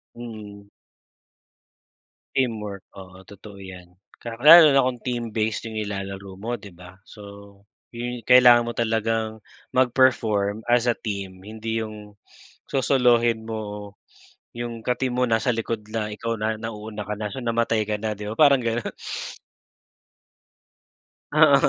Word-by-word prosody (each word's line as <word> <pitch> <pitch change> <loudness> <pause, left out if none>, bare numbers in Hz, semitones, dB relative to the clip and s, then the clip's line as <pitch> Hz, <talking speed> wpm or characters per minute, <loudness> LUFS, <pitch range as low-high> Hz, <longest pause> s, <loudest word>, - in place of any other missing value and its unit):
Mm. 105 -4 -10 1.7
Teamwork, 105 -6 -2
oo, 95 0 -12
totoo 100 0 -12
yan. 90 -2 -11 0.2
Ka 120 -1 -7
lalo 155 -1 +9
na 135 - +5
kung 125 -1 -1
team-based 115 -2 -2
'yong 110 - -7
nilalaro 100 -2 -5
mo, 115 +5 -4
'di 100 -3 -13
ba? 90 +2 -14
So, 105 - -14 0.7
'yon 120 -1 -5
kailangan 125 -1 +7
mo 120 - -4
talagang 110 -1 -1 0.3
mag-perform, 115 -5 +2
as 120 0 +3
a 120 - 0
team, 100 -3 -6
hindi 110 +1 -4
'yong 105 -1 -10 0.5
sosolohin 120 -4 +2
mo, 105 -2 -6 0.6
'yong 120 -1 -6
ka-team 125 0 -1
mo, 125 - +2
nasa 115 +1 0
likod 115 0 -3
la 110 -1 -3
ikaw 115 +2 -3
na 110 0 -2
nauuna 105 -2 -6
ka 105 - -1
na. 105 -1 -5
So, 135 - -6
namatay 115 -2 0
ka 105 - 0
na, 110 0 -3
'di 105 0 -7
ba, 110 - -5
parang 140 -4 +6
gano'n. 115 0 -2 2.4
Oo, - - +6
110 Hz, 135 wpm, -24 LUFS, 105-120 Hz, 2.4 s, lalo